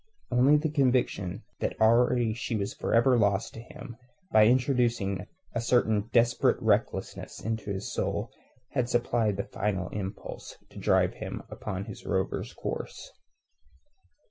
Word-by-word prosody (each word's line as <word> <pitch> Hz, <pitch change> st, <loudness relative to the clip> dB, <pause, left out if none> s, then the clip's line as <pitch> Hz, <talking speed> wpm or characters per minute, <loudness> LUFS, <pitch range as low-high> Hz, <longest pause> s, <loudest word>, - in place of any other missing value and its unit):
Only 130 Hz, +4 st, +5 dB
the 155 Hz, 0 st, -1 dB
conviction 125 Hz, -, +1 dB, 0.2 s
that -, -, -2 dB
already 115 Hz, 0 st, +4 dB
she 115 Hz, 0 st, -3 dB
was 100 Hz, -2 st, -2 dB
for -, -, -4 dB
ever 120 Hz, +1 st, +5 dB
lost 100 Hz, +1 st, +1 dB
to 115 Hz, -, -8 dB
him, 120 Hz, 0 st, -10 dB, 0.3 s
by 110 Hz, 0 st, +6 dB
introducing 120 Hz, -6 st, +1 dB, 0.3 s
a 115 Hz, -, -1 dB
certain 110 Hz, -3 st, +2 dB
desperate 120 Hz, 0 st, +3 dB
recklessness -, -, -1 dB
into 110 Hz, -2 st, -3 dB
his 95 Hz, +1 st, -4 dB
soul -, -, -2 dB, 0.4 s
had 125 Hz, -3 st, 0 dB
supplied 120 Hz, -4 st, +1 dB
the 100 Hz, -, -1 dB
final 95 Hz, -3 st, -2 dB
impulse 95 Hz, -1 st, -6 dB
to -, -, -10 dB
drive -, -, +3 dB
him -, -, -6 dB
upon 100 Hz, -2 st, -5 dB
his 110 Hz, -3 st, -9 dB
rover's 95 Hz, -1 st, -2 dB
course. -, -, -6 dB
115 Hz, 140 wpm, -28 LUFS, 100-125 Hz, 0.4 s, by